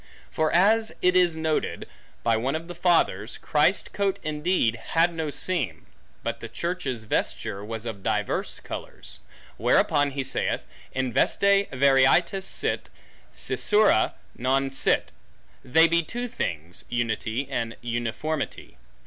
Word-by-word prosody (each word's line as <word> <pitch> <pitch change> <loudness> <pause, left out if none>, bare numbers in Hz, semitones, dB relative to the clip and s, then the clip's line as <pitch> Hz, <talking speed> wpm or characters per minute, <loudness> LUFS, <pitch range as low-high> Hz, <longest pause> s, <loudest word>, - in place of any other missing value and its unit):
For, 155 -1 +1
as 220 +5 +4
it 180 0 +4
is 175 -3 +4
noted, 160 -1 -2 0.4
by 115 -1 +3
one 130 +6 -1
of 165 +1 -5
the 175 - -6
fathers, 175 0 +1
Christ's - - +2
coat 200 -2 -1
indeed 155 -5 +1 0.2
had 170 +1 +4
no 160 -2 -3
seam, 140 - -2 0.4
but 115 0 -3
the 115 - -8
church's 135 -4 -3
vesture 100 -2 -2
was 110 +1 -5
of 110 -4 -5
divers - - -1
colors; - - -8 0.4
whereupon 145 -1 +3
he 135 0 -3
saith, 130 - -1 0.3
In 130 -2 -2
veste 200 - +3
varietas 140 +8 +3
sit, - - -2 0.5
scissura 210 - +3 0.2
non 135 +2 0
sit; 135 - +1 0.5
they 160 +6 +5
be 170 +1 +3
two 240 +9 -5
things, 85 - -4
unity 120 +2 -2
and 115 -4 -3
uniformity. 120 +6 -3
140 Hz, 130 wpm, -25 LUFS, 120-175 Hz, 0.5 s, they